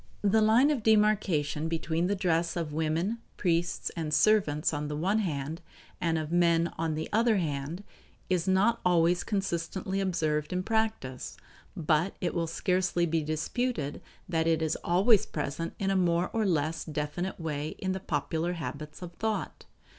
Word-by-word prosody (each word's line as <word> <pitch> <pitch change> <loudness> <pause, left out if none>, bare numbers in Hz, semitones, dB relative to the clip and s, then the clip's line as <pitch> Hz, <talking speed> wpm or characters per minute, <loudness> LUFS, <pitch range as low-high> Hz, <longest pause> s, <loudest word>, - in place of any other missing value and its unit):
The 215 +2 +4
line 230 +7 +5
of 275 -6 0
demarcation 205 -9 +2
between 165 +1 -1
the 200 - +1
dress 170 -3 0
of 165 -4 -3
women, 160 +8 0 0.2
priests, 175 -1 0
and 160 -2 -3
servants, 160 -6 +3
on 145 0 -2
the 150 - -3
one 195 +7 +1
hand, 155 -3 -3 0.4
and 165 -1 +1
of 155 0 -3
men, 170 -1 +3
on 160 -1 -1
the 155 - -3
other 225 0 +4
hand, 155 +2 -3 0.4
is 180 -1 0
not 205 +5 +3
always 175 0 +3
consistently 190 -1 -2
observed 155 -5 0
in 180 0 -1
practice, 220 - -2 0.4
but 160 +3 +1
it 175 - -1
will 165 -1 -1
scarcely 180 +1 +1
be 165 -1 0
disputed 155 - -2 0.3
that 165 -2 0
it 160 -1 +2
is 160 - 0
always 195 +5 +3
present 155 +2 -4
in 195 0 0
a - - +1
more 175 -1 +2
or 220 -2 +1
less 160 -2 0
definite 155 +5 -3
way 155 -2 -3
in 190 - -2
the 190 - -2
popular 160 +1 -1
habits 150 -1 -6
of 175 -1 -8
thought. 220 0 -2
170 Hz, 160 wpm, -29 LUFS, 155-195 Hz, 0.4 s, line